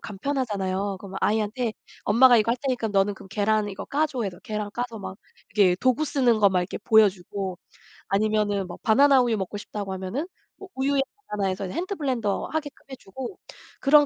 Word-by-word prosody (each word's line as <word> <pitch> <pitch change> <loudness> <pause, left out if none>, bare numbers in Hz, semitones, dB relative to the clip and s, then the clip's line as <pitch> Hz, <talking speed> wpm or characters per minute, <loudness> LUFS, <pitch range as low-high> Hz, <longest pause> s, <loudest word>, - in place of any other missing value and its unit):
간편하잖아요. 200 -5 -2
그러면 195 -1 -7
아이한테 220 +2 0 0.3
"엄마가 240 +3 +6
이거 225 +2 +2
할 - - -1
테니까 250 -5 -1
너는 200 0 +2
그럼 190 - -13
계란 210 +1 +1
이거 195 - -6
까줘." 285 -4 -1
해서 185 -4 -4
계란 210 -1 -4
까서 240 -2 -4
막 190 -1 -7 0.4
이렇게 185 -4 +4
도구 260 +4 +2
쓰는 245 -6 +2
거 200 -1 +6
막 185 -1 +1
이렇게 180 - -4
보여주고 195 -3 +2 0.5
아니면은 205 -1 +1
뭐 175 - -8
바나나 270 +4 +6
우유 235 -3 +1
먹고 190 +1 -4
싶다고 205 -2 -5
하면은 190 - -3 0.3
뭐 390 - -10
우유에 270 +1 +1 0.3
바나나 205 -2 -1
해서 190 +1 -2
이제 185 - -6
핸드 370 +3 -2
블렌더 250 - -1
하게끔 300 -3 -4
해주고. 255 0 -8 0.4
그런 290 +1 +6
215 Hz, 415 characters per minute, -25 LUFS, 195-255 Hz, 0.5 s, 엄마가